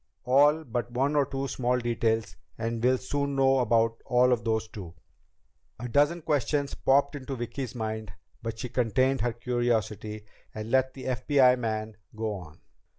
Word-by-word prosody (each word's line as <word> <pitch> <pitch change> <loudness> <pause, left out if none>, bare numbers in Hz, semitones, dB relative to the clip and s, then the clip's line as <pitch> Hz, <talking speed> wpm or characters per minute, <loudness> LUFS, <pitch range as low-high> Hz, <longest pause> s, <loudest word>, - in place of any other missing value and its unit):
All 145 +5 +4
but 120 -3 -3
one 135 +4 0
or 145 -2 +3
two 135 0 -3
small 125 -1 0
details, 115 -2 -1 0.2
and 115 0 -3
we'll 130 +1 +4
soon 140 +2 -2
know 135 -1 +4
all 115 +2 +2
about 120 -2 +1
those 110 -1 0
too." 95 -6 -9 0.8
A 125 - -4
dozen 145 +7 +2
questions 145 0 0
popped 140 +2 +2
into 135 -1 -5
Vicki's 125 +1 -5
mind, 110 -3 -4 0.3
but 115 -1 -5
she 125 +2 -5
contained 130 +2 +1
her 120 0 0
curiosity 110 -3 -2 0.3
and 110 +1 -5
let 130 0 +2
the 130 - -8
FBI 130 0 +3
man 110 -2 -3 0.2
go 110 -1 -2
on. 90 -6 -10
125 Hz, 155 wpm, -28 LUFS, 110-135 Hz, 0.8 s, All